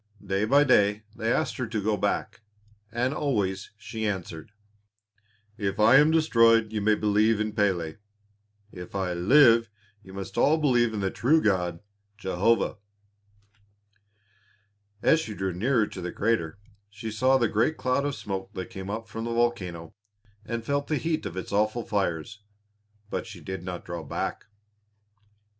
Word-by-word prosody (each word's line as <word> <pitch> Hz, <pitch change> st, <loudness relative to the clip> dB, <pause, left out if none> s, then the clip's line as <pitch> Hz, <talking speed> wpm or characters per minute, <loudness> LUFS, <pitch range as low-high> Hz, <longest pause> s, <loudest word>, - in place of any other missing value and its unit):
Day 95 Hz, +2 st, 0 dB
by 140 Hz, +6 st, +5 dB
day 105 Hz, -6 st, +3 dB
they 115 Hz, +1 st, -1 dB
asked 155 Hz, -, 0 dB
her 125 Hz, -3 st, -2 dB
to 110 Hz, -1 st, -2 dB
go 105 Hz, +1 st, +1 dB
back, 105 Hz, +3 st, -2 dB, 0.5 s
and 125 Hz, +4 st, 0 dB
always 100 Hz, -11 st, -1 dB
she 110 Hz, 0 st, -4 dB
answered, 90 Hz, -3 st, -5 dB, 1.1 s
"If 100 Hz, -1 st, -2 dB
I 110 Hz, +5 st, +7 dB
am 150 Hz, +2 st, +6 dB
destroyed 115 Hz, -8 st, +4 dB
you 105 Hz, -, -1 dB
may 105 Hz, +1 st, +3 dB
believe 105 Hz, +1 st, +2 dB
in 110 Hz, 0 st, -2 dB
Pélé; 90 Hz, -4 st, 0 dB, 0.7 s
if 90 Hz, +1 st, -10 dB
I 95 Hz, -2 st, -1 dB
live 115 Hz, +5 st, +5 dB, 0.3 s
you 95 Hz, -, -14 dB
must 95 Hz, 0 st, -5 dB
all 155 Hz, +2 st, +4 dB
believe 120 Hz, -7 st, +2 dB
in 105 Hz, -, -2 dB
the 95 Hz, -1 st, -1 dB
true 150 Hz, +7 st, +3 dB
God, 90 Hz, -, 0 dB, 0.4 s
Jehovah." 105 Hz, +4 st, +1 dB, 2.3 s
As 160 Hz, -, +5 dB
she 110 Hz, -9 st, -5 dB
drew 95 Hz, -1 st, -2 dB
nearer 115 Hz, +5 st, +2 dB
to 95 Hz, -, -8 dB
the 90 Hz, 0 st, -4 dB
crater 100 Hz, -7 st, -1 dB, 0.3 s
she 110 Hz, +2 st, -7 dB
saw 130 Hz, +5 st, +3 dB
the 120 Hz, -3 st, +2 dB
great 115 Hz, +9 st, +1 dB
cloud 130 Hz, +2 st, 0 dB
of 145 Hz, -2 st, -2 dB
smoke 95 Hz, -1 st, -5 dB
that 95 Hz, -2 st, -6 dB
came 95 Hz, 0 st, -7 dB
up 110 Hz, +2 st, -4 dB
from 115 Hz, 0 st, -6 dB
the 115 Hz, -, -2 dB
volcano 90 Hz, -9 st, -1 dB, 0.5 s
and 115 Hz, +1 st, -5 dB
felt 140 Hz, +1 st, -1 dB
the 155 Hz, -, 0 dB
heat 165 Hz, 0 st, -2 dB
of 85 Hz, -, -8 dB
its 95 Hz, -, -5 dB
awful 110 Hz, +3 st, +1 dB
fires. 100 Hz, 0 st, -2 dB, 0.7 s
But -, -, -3 dB
she 105 Hz, -5 st, -10 dB
did 95 Hz, +3 st, -6 dB
not 90 Hz, -1 st, -6 dB
draw 85 Hz, -1 st, -5 dB
back. 70 Hz, -, -4 dB
105 Hz, 160 wpm, -26 LUFS, 95-120 Hz, 2.3 s, I